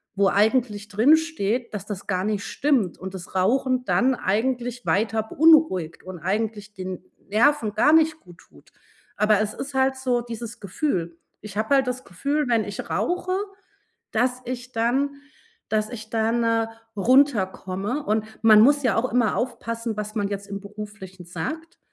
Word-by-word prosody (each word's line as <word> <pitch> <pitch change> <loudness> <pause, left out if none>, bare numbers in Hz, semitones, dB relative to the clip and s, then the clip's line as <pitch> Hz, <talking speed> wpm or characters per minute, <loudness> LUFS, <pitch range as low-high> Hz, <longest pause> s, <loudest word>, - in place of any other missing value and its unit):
wo 200 0 +3
eigentlich 215 0 +1
drinsteht, 245 -2 +2
dass 210 - -5
das 200 -3 -6
gar 185 -1 0
nicht 210 -1 -2
stimmt 260 - 0
und 190 +1 -7
das 180 0 -9
Rauchen 255 +6 +2
dann 260 +2 +3
eigentlich 245 +4 -1
weiter 220 +1 +1
beunruhigt 295 - +3
und 185 -1 -8
eigentlich 210 +3 -2
den 185 -2 -6 0.3
Nerven 225 0 +3
gar 290 +9 +4
nicht 320 0 +4
gut 175 - -17
tut. 75 -2 -21 0.5
Aber 210 0 +3
es 215 0 -2
ist 275 0 -7
halt 265 0 +2
so 250 -2 0
dieses 235 -1 -7
Gefühl. 180 - -2 0.2
Ich 205 -1 -9
habe 220 +6 +2
halt 265 -2 +2
das 255 +1 -3
Gefühl, 285 - -1
wenn 230 -3 +2
ich 200 -1 -7
rauche, 365 +1 -1 0.8
dass 250 +2 0
ich 250 0 -6
dann 260 +5 0 0.5
dass 215 0 0
ich 220 -3 -9
dann, 230 +1 +1
äh, 230 -1 +1 0.3
runterkomme. 210 -1 +1
Und 215 -1 0 0.2
man 215 -1 +8
muss 285 +4 +5
ja 230 -5 +2
auch 245 +3 0
immer 235 -3 +2
aufpassen, 230 -2 -3
was 210 0 -4
man 205 -2 0
jetzt 200 0 -5
im 200 0 -5
Beruflichen 200 -3 -9
sagt. 310 - -6
225 Hz, 160 wpm, -24 LUFS, 200-255 Hz, 0.8 s, man